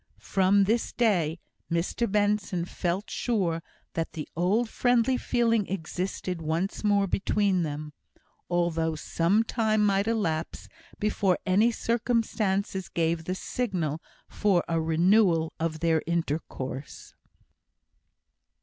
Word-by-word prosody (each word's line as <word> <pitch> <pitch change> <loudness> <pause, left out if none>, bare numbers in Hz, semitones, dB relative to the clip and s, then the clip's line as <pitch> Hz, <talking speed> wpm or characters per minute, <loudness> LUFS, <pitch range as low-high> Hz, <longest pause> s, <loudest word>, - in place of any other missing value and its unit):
From 195 +1 +3
this 225 +4 0
day 180 -9 +1 0.3
Mr 175 +6 0
Benson 205 -4 +1
felt 180 +3 -2
sure 185 -9 0 0.3
that 165 -1 -3
the 155 - -5
old 195 +8 +2
friendly 245 +2 +2
feeling 230 -4 +1
existed 180 0 -4
once 165 +7 -2
more 205 -1 +3
between 195 -1 +1
them, 150 -1 -4 0.6
although 165 -2 0
some 175 +7 +1
time 215 -2 +1
might 200 +1 +2
elapse 170 -8 -1 0.3
before 205 -3 +1
any 200 +5 +4
circumstance 220 -5 -1
gave 165 -1 0
the 185 - -2
signal 180 - -2 0.3
for 195 -5 +1
a 165 -1 0
renewal 165 0 +3
of 160 -1 -2
their 165 -2 +2
intercourse. 145 -5 -4
185 Hz, 110 wpm, -27 LUFS, 165-210 Hz, 0.6 s, any